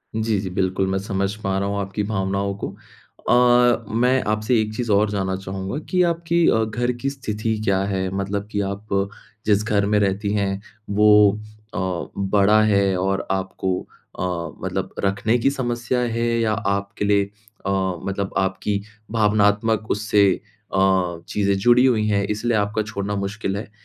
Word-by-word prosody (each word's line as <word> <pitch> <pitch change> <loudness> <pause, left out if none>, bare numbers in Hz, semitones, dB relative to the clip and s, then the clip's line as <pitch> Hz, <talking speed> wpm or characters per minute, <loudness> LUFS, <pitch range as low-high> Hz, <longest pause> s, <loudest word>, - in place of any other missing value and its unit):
जी, 110 -2 0
जी 95 -1 -4
बिल्कुल 95 +1 0
मैं 95 - 0
समझ 100 0 -2
पा 95 -2 -1
रहा 100 - -1
हूँ 100 0 -2
आपकी 100 +1 -3
भावनाओं 100 -1 -1
को। - - -1 0.6
अ, 120 -1 +4
मैं 125 +3 +3
आपसे 110 +3 +1
एक 110 0 -3
चीज़ 120 -1 -2
और 105 +1 +3
जानना 95 -2 -1
चाहूँगा 95 +4 -5
कि 180 - +2
आपकी 170 0 +1
अ, 110 - +3
घर 120 +3 -1
की 135 - 0
स्थिति 110 -5 -3
क्या 95 -2 +2
है? 95 -1 -1
मतलब 100 +1 -2
कि 100 - 0
आप 100 +2 -7 0.6
जिस 105 -1 +3
घर 105 -2 +1
में 105 0 +2
रहती 100 +1 0
हैं 100 -1 -1 0.3
वो 105 0 +6 0.3
अ, - - -4 0.4
बड़ा 100 +2 +4
है 100 -2 +3
और 95 +1 -1
आपको 95 -1 -1 0.4
अ, - - -1 0.4
मतलब - - -3
रखने 100 +4 +1
की 130 +4 +2
समस्या 120 -2 -1 0.2
है 115 - +1
या 110 -2 +1
आपके 100 -1 -2
लिए 100 -1 +3 0.4
अ, - - 0 0.4
मतलब 100 0 -3
आपकी 100 +1 0 0.3
भावनात्मक 110 0 +2
उससे 105 -1 +3 0.5
अ, 95 -3 +2
चीज़ें 100 -1 +1
जुड़ी 120 +5 +5
हुई 110 -4 +2
हैं 100 -1 +2
इसलिए 110 +2 0
आपका 105 +1 0
छोड़ना 105 -1 -4
मुश्किल 100 0 -3
है? 110 +3 -6
105 Hz, 165 wpm, -22 LUFS, 100-110 Hz, 0.6 s, वो